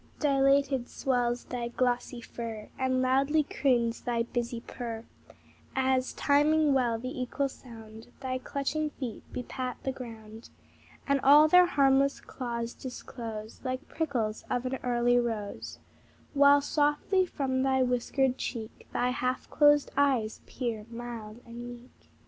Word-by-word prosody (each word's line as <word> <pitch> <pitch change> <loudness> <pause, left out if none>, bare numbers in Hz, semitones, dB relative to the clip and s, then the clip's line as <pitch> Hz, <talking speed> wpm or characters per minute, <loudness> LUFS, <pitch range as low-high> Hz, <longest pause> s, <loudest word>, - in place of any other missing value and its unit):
Dilated 275 -2 +3
swells 245 -2 0
thy 245 -1 -3
glossy 245 0 -1
fur, 225 -3 -7
And 260 0 +1
loudly 275 +4 +3
croons 240 -5 +1
thy 235 -1 0
busy 235 0 -3
purr, 230 -2 -6 0.7
As, 260 -1 +1
timing 295 +1 +3
well 245 -4 +2
the 255 +2 -5
equal 275 +3 -1
sound, 225 -4 -12
Thy 255 -1 -3
clutching 285 +4 -2
feet 255 -7 -6
bepat 250 0 -4
the 265 - -1
ground, 225 -3 -10 0.6
And 280 -1 +2
all 290 +3 +8
their 360 +2 +7
harmless 275 -3 +3
claws 235 -2 -5
disclose 230 -4 -7
Like 255 +2 -3
prickles 240 -9 -2
of 250 0 -1
an 260 +1 -1
early 245 0 +3
rose, 220 -4 -4 0.6
While 285 0 +6
softly 295 +6 +1
from 260 -5 -1
thy 265 -1 +3
whiskered 250 +1 +1
cheek 225 -2 -6
Thy 250 +1 +1
half 255 0 -2
closed 290 -1 +5
eyes 265 -6 +1
peer, 230 -4 -4
mild 230 -1 -7
and 240 +1 -8
meek. 245 +1 -14
255 Hz, 130 wpm, -29 LUFS, 235-275 Hz, 0.7 s, all